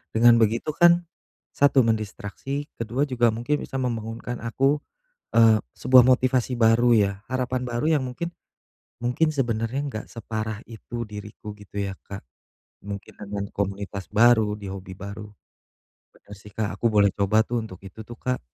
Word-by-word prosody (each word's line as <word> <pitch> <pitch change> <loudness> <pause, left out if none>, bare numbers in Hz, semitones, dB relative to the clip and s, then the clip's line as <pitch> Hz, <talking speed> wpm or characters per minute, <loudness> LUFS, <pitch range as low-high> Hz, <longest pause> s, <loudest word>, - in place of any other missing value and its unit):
Dengan 115 +1 +6
begitu 115 +6 +1
kan 175 +1 +5 0.5
1 140 -2 +4
mendistraksi, 110 +6 -3
ke-2 115 +4 -1
juga 125 -4 +2
mungkin 120 +7 -1
bisa - - -8
membangunkan 115 -1 -3
aku, 135 +5 +1 0.5
eee, 110 -2 +5 0.2
sebuah 130 -1 +7
motivasi 130 0 +2
baru 115 +1 +4
ya, 100 -2 +3 0.2
harapan 130 0 -1
baru 120 +3 -2
yang 140 - -1
mungkin 130 +7 -4 0.8
mungkin 125 +7 +2
sebenarnya 120 -3 -1
enggak 110 -7 -5
separah 110 -1 -5
itu 120 +1 -7
diriku 105 0 -9
gitu 105 -1 -12
ya, 100 -1 -3
Kak, 100 0 -9 0.6
mungkin 100 0 -7
dengan 100 -1 -5
komunitas 100 -1 -4
baru 110 0 +5
di 100 -1 -8
hobi 95 -1 -9
baru. 100 +2 -8 0.9
Bener 105 - -14
sih, 105 +1 -13
Kak, 105 0 -3
aku 115 - +1
boleh 105 -2 +4
coba 105 +2 +2
tuh 120 -1 -1
untuk 95 -4 -9
itu 95 +3 -10
tuh, 120 +2 -10
Kak. 125 0 -2
115 Hz, 150 wpm, -25 LUFS, 105-125 Hz, 0.9 s, sebuah